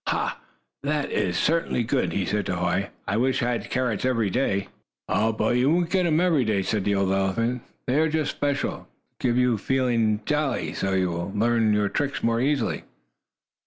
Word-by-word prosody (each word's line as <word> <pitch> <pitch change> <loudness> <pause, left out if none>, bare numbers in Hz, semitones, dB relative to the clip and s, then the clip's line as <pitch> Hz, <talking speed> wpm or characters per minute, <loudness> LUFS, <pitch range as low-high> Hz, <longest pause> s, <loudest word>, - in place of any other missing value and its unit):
"Ha! - - -1 0.4
That 145 +1 -1
is 90 -2 0
certainly 165 - +1
good!" 125 +3 0
he 95 - -1
said 105 +2 -1
to 90 - -1
Hoy. 90 +3 0 0.2
"I 100 - 0
wish 130 +2 +1
I 120 - +1
had 120 - -3
carrots 125 -5 -1
every 115 -6 +1
day." 100 -6 0 0.4
"Oh, 110 - +2
but 115 +2 +1
you 125 +3 +3
won't 170 +1 +1
get 185 -2 +2
them 160 -2 +2
every 170 -7 +3
day," 105 -4 0
said 105 0 -1
the 100 - +2
old 95 -1 +1
elephant. 115 +6 0 0.2
"They 130 +4 +1
are 160 0 +3
just 155 -1 0
special, 145 -1 -2 0.3
to - - 0
get 120 +1 +2
you 125 -3 +3
to - - -18
feeling 115 -5 +1
jolly, 140 - -1
so 95 +1 -1
you 95 -2 +1
will 85 +3 -4
learn 115 0 +2
your 105 -1 +2
tricks 140 +6 -2
more 115 0 +2
easily." 135 -2 0
120 Hz, 200 wpm, -25 LUFS, 100-135 Hz, 0.4 s, you